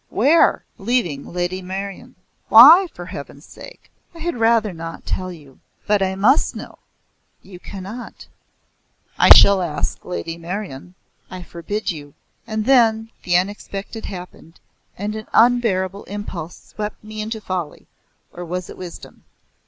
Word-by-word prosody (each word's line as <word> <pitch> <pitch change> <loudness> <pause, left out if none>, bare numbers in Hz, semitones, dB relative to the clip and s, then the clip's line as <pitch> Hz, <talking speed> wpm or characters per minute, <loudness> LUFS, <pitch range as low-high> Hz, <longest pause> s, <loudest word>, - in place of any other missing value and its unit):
Where?" 295 +9 +3 0.2
"Leaving 195 - -1
Lady 180 +1 -2
Meryon." 190 +1 -7 0.3
"Why 310 - +9
for 175 - -9
Heaven's 145 -4 -9
sake?" - - -14 0.2
"I - - -11
had 340 -1 -3
rather 225 -3 +2
not 165 0 -8
tell 185 0 -3
you." 145 -6 -14 0.3
"But 210 -1 +2
I 190 0 0
must 230 +10 +3
know." - - -9 0.6
"You 185 -2 -12
cannot." 200 +6 -9 0.9
"I - - +6
shall 200 -1 +9
ask 160 -4 -3
Lady 170 -2 -5
Meryon." 180 -2 -7 0.3
"I 185 -1 -8
forbid 175 +6 -4
you." 145 -3 -10 0.3
And 215 -1 -2
then 225 -4 +3
the 175 -1 +2
unexpected 200 +3 -4
happened, 180 -3 -10 0.4
and 210 +2 -4
an 215 0 -7
unbearable 205 -5 +2
impulse 190 -5 -7
swept 210 0 -7
me 215 0 -7
into 220 +1 -4
folly 185 -6 -5 0.5
or 175 - -7
was 180 +1 -5
it - - -12
wisdom? 180 -2 -10
195 Hz, 135 wpm, -20 LUFS, 175-220 Hz, 0.9 s, Why